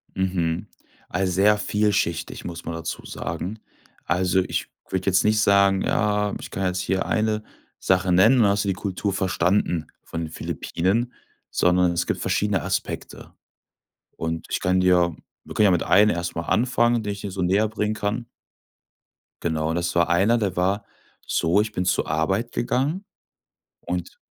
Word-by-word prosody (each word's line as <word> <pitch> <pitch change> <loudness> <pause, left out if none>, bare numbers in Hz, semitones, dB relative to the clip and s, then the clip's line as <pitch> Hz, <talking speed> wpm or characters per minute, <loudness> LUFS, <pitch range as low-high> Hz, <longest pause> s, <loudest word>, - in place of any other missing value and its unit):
Mhm, 90 -3 -1 0.4
also, 90 +1 0
sehr 105 +3 +4
vielschichtig, 105 -5 -1
muss 85 -1 -7
man 85 - -4
dazu 80 -1 -5
sagen. 95 +6 -5 0.5
Also, 90 +1 +2
ich - - -3 0.2
würde 95 0 -2
jetzt 95 -2 +4
nicht 105 0 +3
sagen: 100 -1 +4
„Ja, 105 -1 +1
ich - - -9
kann 95 0 -2
jetzt 90 0 0
hier 95 +1 -1
eine 110 -1 0 0.4
Sache 95 0 +2
nennen 105 +9 +6
und - - +5
dann 100 - +4
hast 100 0 0
du - - -2
die - - +2
Kultur 100 +1 -3
verstanden 90 -3 +1 0.2
von 85 - -5
den 80 - -4
Philippinen.“, 105 +10 -1 0.4
sondern 90 0 +3
es 85 - -1
gibt - - -2
verschiedene 105 -4 +1
Aspekte. - - -4 0.8
Und 80 0 -4
ich - - -1
kann 90 +1 +2
dir 90 -3 +3 0.3
wir - - -9
können 105 - +4
ja 95 - +5
mit 90 - +2
einem 105 +2 +5
erst 85 0 -3
mal 85 - -2
anfangen, 120 +3 +2
den 105 -1 -3
ich 100 - -9
dir 100 - -5
so 95 - -4
näher 95 +5 +2
bringen 105 0 -2
kann. 110 +3 -2 1.2
Genau, 80 -1 0
das 85 +1 -1
war 85 -1 +3
einer, 100 +7 +3
der 100 -5 -1
war 100 +3 +1 0.4
so, 85 +5 +2
ich 105 0 -3
bin 90 -2 -2
zur 90 - +1
Arbeit 95 +10 0
gegangen 145 +11 -1 0.8
und 90 -1 -4
95 Hz, 170 wpm, -24 LUFS, 90-105 Hz, 1.2 s, nennen